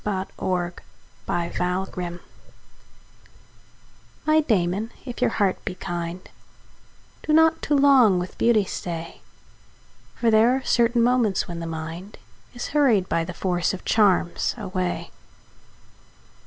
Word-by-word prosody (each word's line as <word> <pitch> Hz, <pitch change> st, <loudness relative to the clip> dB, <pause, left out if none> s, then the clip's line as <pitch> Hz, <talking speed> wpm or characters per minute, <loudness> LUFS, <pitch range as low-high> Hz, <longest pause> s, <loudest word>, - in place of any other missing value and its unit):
from 195 Hz, -2 st, -2 dB
The -, -, -8 dB
Lover's 175 Hz, -1 st, -1 dB, 0.5 s
Watch 170 Hz, 0 st, -2 dB
(1686) 180 Hz, -1 st, -3 dB, 2.0 s
My 310 Hz, 0 st, +4 dB
Damon, 205 Hz, -, 0 dB, 0.2 s
if 245 Hz, -3 st, -7 dB
your -, -, +3 dB
heart 200 Hz, -3 st, 0 dB
be 180 Hz, -, -4 dB
kind, 175 Hz, 0 st, -5 dB, 0.9 s
Do -, -, -3 dB
not 320 Hz, +1 st, +4 dB
too 295 Hz, -, +1 dB
long 270 Hz, -8 st, +5 dB
with 180 Hz, +1 st, -4 dB
beauty 225 Hz, -4 st, +3 dB
stay; 170 Hz, -2 st, -6 dB, 0.9 s
For 230 Hz, -2 st, +1 dB
there 225 Hz, +3 st, +5 dB
are 265 Hz, -, -3 dB
certain 235 Hz, 0 st, +3 dB
moments 240 Hz, -5 st, +2 dB
when 170 Hz, -1 st, -6 dB
the 165 Hz, -, -5 dB
mind 165 Hz, +5 st, -7 dB, 0.4 s
Is 245 Hz, -, -5 dB
hurried 250 Hz, -11 st, +2 dB
by 165 Hz, -, +1 dB
the 175 Hz, +1 st, -7 dB
force 180 Hz, 0 st, 0 dB
of 185 Hz, -, -12 dB
charms 195 Hz, -5 st, +2 dB
away. 185 Hz, -4 st, -3 dB
190 Hz, 130 wpm, -24 LUFS, 175-235 Hz, 2.0 s, long